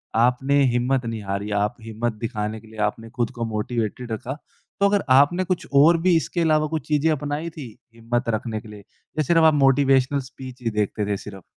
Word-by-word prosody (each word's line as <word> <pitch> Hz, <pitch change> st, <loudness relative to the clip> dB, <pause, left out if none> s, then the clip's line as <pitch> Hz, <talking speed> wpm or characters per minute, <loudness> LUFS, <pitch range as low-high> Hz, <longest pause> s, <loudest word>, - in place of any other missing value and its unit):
आपने 125 Hz, +4 st, +3 dB
हिम्मत 125 Hz, +1 st, +1 dB
नहीं 115 Hz, -1 st, -4 dB
हारी, 100 Hz, +2 st, -3 dB
आप 105 Hz, +3 st, 0 dB
हिम्मत 115 Hz, +1 st, -3 dB
दिखाने 110 Hz, -1 st, -3 dB
के 110 Hz, -, -17 dB
लिए 110 Hz, 0 st, -12 dB
आपने 115 Hz, +1 st, -12 dB
खुद 120 Hz, -1 st, -2 dB
को 115 Hz, -, 0 dB
मोटिवेटेड 115 Hz, +1 st, -3 dB
रखा। 130 Hz, +6 st, -4 dB, 0.4 s
तो 200 Hz, -, +4 dB
अगर 205 Hz, 0 st, +1 dB
आपने 175 Hz, +7 st, +4 dB
कुछ 185 Hz, -1 st, -2 dB
और 165 Hz, +3 st, +6 dB
भी 180 Hz, 0 st, +4 dB
इसके 170 Hz, +1 st, -2 dB
अलावा 155 Hz, -1 st, +2 dB
कुछ 160 Hz, 0 st, -4 dB
चीज़ें 155 Hz, +1 st, +2 dB
अपनाई 150 Hz, +3 st, -2 dB
थी 150 Hz, -6 st, -9 dB, 0.3 s
हिम्मत 115 Hz, +1 st, -2 dB
रखने 110 Hz, -1 st, -5 dB
के -, -, -14 dB
लिए 105 Hz, -1 st, -10 dB
या 155 Hz, +9 st, -6 dB
सिर्फ 165 Hz, +3 st, +3 dB
आप 160 Hz, -, +6 dB
मोटिवेशनल 135 Hz, 0 st, +3 dB
स्पीच 130 Hz, -1 st, -10 dB
ही 115 Hz, -, +1 dB
देखते 105 Hz, 0 st, -1 dB
थे 100 Hz, -, 0 dB
सिर्फ। 95 Hz, -2 st, -10 dB
125 Hz, 200 wpm, -23 LUFS, 110-150 Hz, 0.4 s, और